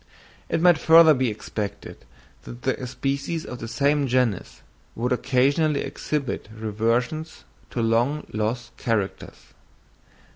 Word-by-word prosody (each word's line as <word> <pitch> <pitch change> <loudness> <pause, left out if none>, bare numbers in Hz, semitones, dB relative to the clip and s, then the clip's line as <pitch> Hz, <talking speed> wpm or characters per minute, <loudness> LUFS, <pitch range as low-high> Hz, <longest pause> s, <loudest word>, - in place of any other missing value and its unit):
It - - 0
might 175 -1 +5
further 160 -1 +7
be 130 -3 +1
expected 105 -1 -6 0.4
that - - -10
the 125 - -1
species 140 +5 -3
of 125 - -7
the 115 - -6
same 140 +4 +1
genus 125 -5 -1 0.3
would 125 +3 -2
occasionally 140 +4 +2
exhibit 140 -8 -3
reversions 115 +8 -2 0.3
to 120 - -2
long 120 +7 +1
lost 115 +3 -3
characters. 110 -5 -3
125 Hz, 115 wpm, -24 LUFS, 115-145 Hz, 0.4 s, further